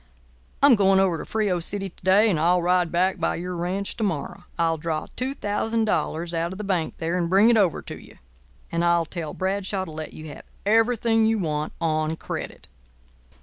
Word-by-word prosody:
"I'm 285 -2 +8
going 195 -3 +4
over 185 -4 +2
to - - -6
Frio 205 -5 0
City 195 +3 -3
to 180 - -22
day, 195 +4 +5
and 165 - 0
I'll 175 +3 +3
ride 180 -1 +2
back 185 +2 +1
by - - 0
your 180 +1 -5
ranch 185 +3 -3
to 225 - -2
morrow. 175 -1 -3
I'll 165 -2 +1
draw 160 -1 -2
$2,000 210 - -1
out 165 +1 -1
of 190 - -7
the 210 - -5
bank 185 -5 -1
there 165 +1 -2
and 170 -1 -1
bring 200 +5 +5
it - - +4
over 190 -7 +2
to - - -9
you; - - -16 0.5
and 170 0 0
I'll 170 -1 +3
tell 160 -2 -6
Bradshaw 190 0 -2
to 160 - -9
let 155 0 -7
you 155 0 -9
have - - -11 0.2
everything 225 +1 +3
you 225 0 +2
want 155 -5 -2
on 155 -1 0
credit. - - -7
180 Hz, 195 wpm, -24 LUFS, 165-205 Hz, 0.5 s, I'm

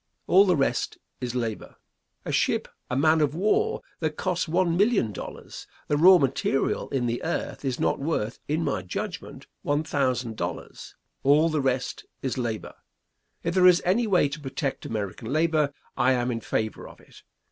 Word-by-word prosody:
All 195 +2 +6
the 180 -3 +3
rest 135 -2 0 0.2
is 125 0 -4
labor. 115 -4 -3 0.5
A - - -3
ship, - - +1 0.2
a 125 - -1
man 155 +3 +4
of 150 0 +1
war 430 - +1 0.2
that 155 -2 -2
costs 180 -2 -1
one 170 +1 +2
million 200 - +3
dollars - - -8 0.2
the 150 - +3
raw 180 +5 +8
material 135 -2 0
in 130 -3 -1
the 120 0 -1
earth 165 - -3
is 130 -3 -2
not - - +1
worth, 135 -7 -2
in 155 +3 0
my 140 -11 -1
judgment, 90 0 -6 0.2
one 145 +2 0
thousand 130 -6 -1
dollars. - - -6 0.3
All 150 +4 +4
the 155 -2 0
rest 130 -1 -2 0.2
is 130 - -1
labor. 115 -4 -3 0.7
If 170 - -1
there 185 0 +6
is 180 -1 +7
any 215 +6 +2
way 180 -7 +4
to 145 +3 -6
protect 135 0 -4
American 110 +1 -4
labor, 155 -1 +2 0.2
I 130 - +3
am 125 0 0
in 115 -1 -3
favor 110 -1 -2
of - - -14
it. - - -18
145 Hz, 175 wpm, -26 LUFS, 125-170 Hz, 0.7 s, raw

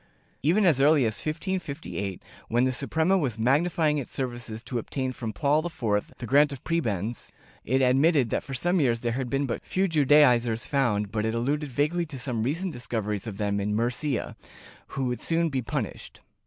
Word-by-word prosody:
^ - - -34 0.4
Even 180 +9 +3
as 150 -7 +4
early 145 -2 +5
as 110 -1 0
1558, 140 - -4 0.2
when 120 +2 +2
the 130 - +2
Suprema 160 +8 +1
was 125 - -1
magnifying 150 +5 +2
its 135 - -7
services 120 -4 -4
to 125 - -3
obtain 130 +3 -3
from 120 -3 -5
Paul 145 +9 +1
IV 110 -11 -2
the 120 - -6
grant 145 +5 +4
of 135 -3 -8
prebends, 115 - -2 0.3
it 130 +2 +1
admitted 135 0 +3
that - - 0
for 135 - -7
some 175 +7 +1
years 120 -4 +1
there 120 - -1
had 125 +1 -3
been 140 +2 0
but 120 - -3
few 190 +1 0
Judaizers 130 -7 +4
found, 105 -8 0
but 105 -1 -1
it 110 +1 -1
alluded 145 +5 -1
vaguely 150 +7 0
to 145 -3 -7
some 125 -3 -2
recent 165 +9 -1
dis 120 0 -6
coveries 105 -2 -2
of 100 -3 -6
them 100 -1 0
in 105 +1 -1
Murcia, 125 +3 -1 0.6
who 135 - 0
would 125 -1 -2
soon 165 0 +1
be 135 -3 -1
punished. 115 - -5
130 Hz, 195 wpm, -26 LUFS, 115-150 Hz, 0.6 s, early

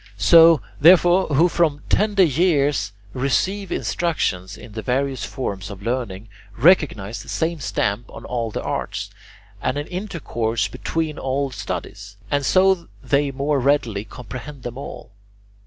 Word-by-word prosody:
Those, 165 -2 +8 0.2
therefore, 175 +3 +6
who 155 +4 +4
from 160 -4 0
tender 210 -2 +3
years 145 - +2 0.2
receive 185 +10 -1
instruction 125 - -1
in - - -12
the 110 +1 -5
various 130 +3 -1
forms 100 -7 -4
of 100 -1 -9
learning, 115 -4 -3 0.3
recognize 120 - +3
the - - -13
same 165 0 -1
stamp 110 -3 -2
on - - -10
all 120 -2 -2
the - - -5
arts, - - -4 0.5
and 135 - -1
an 145 - -3
intercourse 120 - -2
between 155 +8 -3
all 135 +1 -1
studies, 100 -4 -6
and 145 0 +1
so 185 +2 +3 0.2
they 145 0 +1
more 140 +2 0
readily 125 -7 +1
comprehend 125 +5 -9
them 120 -1 -6
all. - - -9
140 Hz, 140 wpm, -22 LUFS, 115-165 Hz, 0.5 s, Those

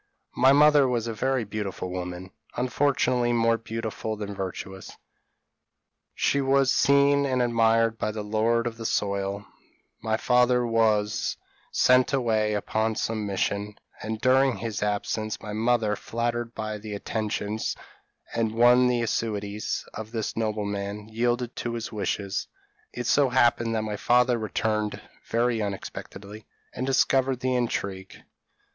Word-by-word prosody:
My 130 +2 +5
mother 145 -1 +6
was 120 -3 -1
a 115 - -3
very 130 +2 0
beautiful 100 -3 -5
woman, 90 0 -6 0.3
unfortunately 125 -2 +1
more 115 -1 +2
beautiful 110 -1 -4
than 105 -1 -5
virtuous: 95 0 -6 1.2
she 140 - +1
was 135 -1 +3
seen 140 0 +4
and 130 -1 0
admired 115 -1 +2
by - - -1
the 105 -1 -5
lord 110 +3 +1
of 115 -1 -4
the 115 - -7
soil; 100 0 -1 0.6
my 110 0 0
father 125 +1 +3
was 110 -3 +1 0.3
sent 125 +2 +4
away 110 -5 +1
upon 110 +2 -1
some 110 -1 -2
mission; 100 +1 -2 0.3
and, 110 +1 -4
during 130 +2 +3
his 115 -3 -4
absence, 105 +1 -2
my 105 - -7
mother, 110 -1 +1
flattered 120 +2 -3
by 110 -1 -4
the 105 0 -6
attentions, 105 0 -3 0.6
and 110 -1 -1
won 120 +2 +6
by - - +2
the 120 -1 +1
assiduities, 105 -2 -2
of 110 0 -7
this 115 -2 -3
nobleman, 105 -1 -3
yielded 120 +2 -1
to 120 -1 -3
his 115 -1 -5
wishes. 100 -2 -2 0.4
It 120 - -5
so 140 -2 +3
happened 120 -2 +2
that 110 - 0
my 105 -1 -3
father 125 +1 +3
returned 105 -1 -1 0.3
very 115 0 +1
unexpectedly, 100 +1 -7 0.3
and 130 - -3
discovered 130 -1 +2
the 130 0 0
intrigue. 100 -6 -3
115 Hz, 140 wpm, -26 LUFS, 105-125 Hz, 1.2 s, mother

